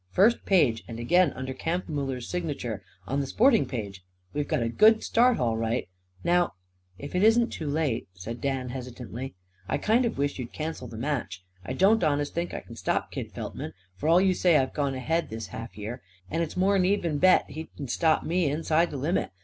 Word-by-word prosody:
"First 215 - +3
page; 140 - +3
and 115 0 -7
again, 170 +6 +4
under 130 +1 -5
Kampfmuller's 140 -5 -3
sign'ture, 145 - -3 0.2
on 135 +6 -1
the 140 - -1
sporting 230 - +4
page. 100 -7 -5 0.3
We've 145 0 -1
got 120 - 0
a - - 0
good 215 - +5
start, 245 +1 +4
all 115 -2 +1
right. 115 +2 -1 0.4
Now 175 -7 +2 0.2
" 90 0 -42
"If 140 +5 -8
it 180 - +1
isn't 230 +2 +5
too 155 - -5
late," 145 -5 -1
said 115 +6 -7
Dan 135 -2 -1
hesitantly, 125 -1 -7 0.3
"I - - +1
kind 230 +4 +3
of 235 - -2
wish 140 0 -1
you'd 125 -1 -6
cancel 155 -5 -4
the 110 -1 -9
match. 120 -8 -3 0.2
I 95 - -4
don't 200 +2 +4
honest 145 -2 +1
think 170 +1 -2
I - - -5
c'n 115 - -12
stop 95 - -1
Kid - - -5
Feltman; - - -6 0.2
for 150 +10 -1
all 170 +2 +7
you 190 0 +4
say 175 -3 +4
I've 130 -1 0
gone 140 -3 -1
ahead 160 +6 -1
this 110 0 -5
half 115 0 -7
year. 110 +4 -6 0.3
And 165 - 0
it's 165 +1 -3
more'n 195 +2 +3
an - - +2
even 175 -6 +1
bet 185 +2 +5
he 160 +3 -7
c'n 140 - -5
stop 160 +5 +2
me 175 -1 +1
inside 160 +3 +1
the 145 - -5
limit. 155 +7 0
145 Hz, 210 wpm, -27 LUFS, 125-175 Hz, 0.4 s, all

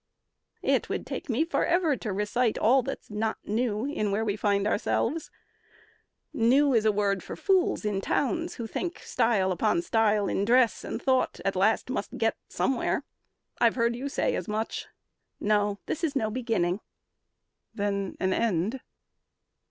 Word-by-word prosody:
"It - - +1
would - - -3
take 360 - -6
me 255 +7 +2
forever 335 -2 +2
to 220 -4 -4
recite 210 +4 0
All 255 +5 +4
that's 235 - -6
not 220 +1 -1
new 220 +1 -1
in 275 -8 -1
where 215 +3 0
we 200 -2 0
find 200 -1 +1
ourselves. 235 +8 0 1.0
New 265 +5 +4
is 220 -2 +3
a 215 - +5
word 200 -2 0
for - - -7
fools 375 - +1
in 200 -2 0
towns 330 - -1
who 235 - -5
think 345 - -4
Style 200 -5 +1
upon 340 - +1
style 215 - +2
in 195 - 0
dress 240 +2 +3
and - - -4
thought 260 0 +1
at 195 - +1
last 215 +6 +2
Must 210 - -3
get 225 0 +1
somewhere. 265 -3 0 0.6
I've 235 -1 +4
heard 235 -1 +1
you 270 +4 -4
say 280 - 0
as - - -4
much. 215 +1 -3 0.5
No, 205 -1 +1
this 325 - -4
is 310 -3 0
no 220 -5 0
beginning." 220 -7 0 1.0
"Then 200 -2 -2
an 190 0 +1
end?" 220 +4 0
225 Hz, 160 wpm, -27 LUFS, 205-260 Hz, 1.0 s, a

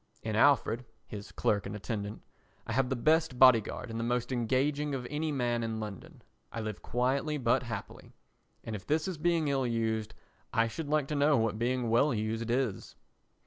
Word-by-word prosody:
In 110 -1 -2
Alfred 125 -1 +3 0.2
[his 105 0 -8
clerk 100 -2 0
and 100 - -5
attendant] 105 0 -5 0.4
I 110 - -4
have 130 +1 +1
the 130 - 0
best 155 +1 +2
body 130 -3 +8
guard 115 +3 -7
and 115 - -4
the - - -1
most 120 +1 -1
engaging 135 +4 0
of 125 -2 -4
any 155 +1 -1
man 120 -4 0
in 115 -1 -3
London. 105 -3 -8 0.3
I - - -5
live 110 -4 -5
quietly 135 +5 0
but 115 -4 +2
happily. - - -7 0.5
And 110 - -5
if 95 - -9
this 155 +3 +1
is 180 -5 -4
being 165 -1 +2
ill 135 -2 +1
used 110 -2 -1 0.4
I 115 -2 +2
should 145 +6 -5
like 150 -2 +2
to 150 - -1
know 145 0 +4
what 110 -1 0
being 120 -1 0
well 125 +3 +3
used 110 +2 -2
is. 120 -5 -1
120 Hz, 190 wpm, -31 LUFS, 110-140 Hz, 0.5 s, body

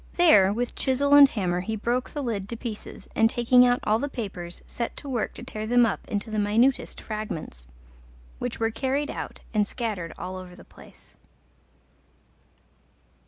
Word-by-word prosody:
There 210 - +6
with 240 +4 -2
chisel 280 +2 +1
and 285 -1 +9
hammer 180 -6 -1
he 220 +5 -3
broke 240 +4 -1
the 290 - -5
lid 210 -5 -3
to 235 - -5
pieces, 225 -3 -7
and 225 0 +4
taking 245 +1 +5
out 245 0 +2
all 215 +1 +2
the 285 +3 -2
papers, 185 -9 -6
set 235 - -5
to 285 - -8
work 245 -5 -2
to - - -7
tear 215 -4 -5
them 245 +1 +5
up 220 - -3
into 210 +1 -3
the 215 - -1
minutest 225 +6 +2
fragments, 165 - -6 0.7
which - - -4
were 225 0 +1
carried 275 +4 -1
out - - -7
and 210 -2 +2
scattered 205 -10 -4
all 185 0 -6
over 180 -1 -10
the - - -14
place. - - -15
225 Hz, 170 wpm, -26 LUFS, 205-250 Hz, 0.7 s, and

